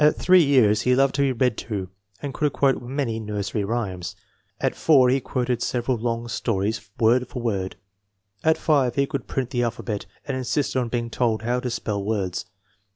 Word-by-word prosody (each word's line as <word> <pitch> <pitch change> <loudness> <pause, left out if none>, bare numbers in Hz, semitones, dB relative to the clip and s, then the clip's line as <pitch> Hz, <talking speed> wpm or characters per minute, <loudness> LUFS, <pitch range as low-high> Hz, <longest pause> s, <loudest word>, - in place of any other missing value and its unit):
At 150 - +3
8 185 0 +8
years 125 -9 +4
he 125 +1 +3
loved 135 +1 +3
to 140 - 0
be 140 -1 +3
read 125 -2 +1
to, 100 -5 -4 0.4
and 140 -2 -3
could 150 0 0
quote 135 -2 +2
many 120 -2 -2
nursery 105 -1 -3
rhymes. 100 -5 -3 0.4
At - - 0
4 135 -6 +5
he 135 +2 +3
quoted 125 -1 -1
several 125 +1 0
long 115 0 -2
stories 110 -1 -2
word 120 +3 +3
for 125 - -6
word. 95 -5 -1 0.7
At 160 0 +4
5 135 -6 +2
he 140 - +3
could 140 -3 -5
print 130 -2 -2
the 120 - 0
alphabet, 115 -3 -3 0.2
and 135 - -1
insisted 130 +1 0
on 120 -2 -2
being 115 0 -2
told 115 -3 0
how 120 +2 0
to 125 - -3
spell 105 -4 -2
words." 100 -4 -2
120 Hz, 190 wpm, -24 LUFS, 110-135 Hz, 0.7 s, 8